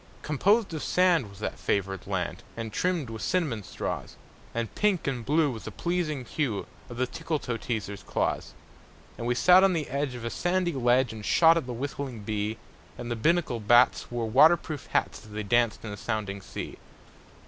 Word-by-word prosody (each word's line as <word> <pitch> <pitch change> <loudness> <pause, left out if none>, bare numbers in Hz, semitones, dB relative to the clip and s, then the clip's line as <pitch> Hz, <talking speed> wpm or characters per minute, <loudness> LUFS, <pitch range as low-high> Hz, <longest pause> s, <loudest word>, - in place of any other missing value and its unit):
Composed 195 - +2
of 155 - -3
sand 175 - +3
was 100 - -14
that 105 - -4
favored 95 -2 -1
land, 90 -2 -2 0.2
And 115 -2 -5
trimmed 175 -9 0
with 110 -1 -6
cinnamon 155 - 0
straws; 95 - -5 0.4
And 115 -2 -3
pink 205 -4 +1
and 130 -4 -2
blue 150 +2 +2
was 110 -5 -8
the 110 - -5
pleasing 155 - -2
hue 120 -5 -2 0.2
Of 120 - -8
the 130 - +2
Tickletoeteaser's 120 -9 -3
claws. - - -2 0.6
And 115 - -4
we 120 - +1
sat 180 +8 +7
on 195 -1 +5
the 155 -4 -1
edge 140 -2 -1
of 120 -1 -7
a 115 - -2
sandy 175 -1 0
ledge 125 -1 +2
And 110 -1 -8
shot 165 +8 +5
at 165 -6 -1
the 125 - -4
whistling 130 -2 -5
bee; 105 +1 -2 0.4
And 120 0 -5
the - - 0
Binnacle 155 0 +1
bats 120 +4 +4
wore 120 -2 -2
water 160 +10 +7
proof 150 -4 -7
hats - - -1
As 105 - -13
they 105 0 -3
danced 115 +2 +1
in 110 - -5
the 105 - -6
sounding 105 -3 -3
sea. 90 - -7
120 Hz, 190 wpm, -28 LUFS, 110-160 Hz, 0.6 s, sat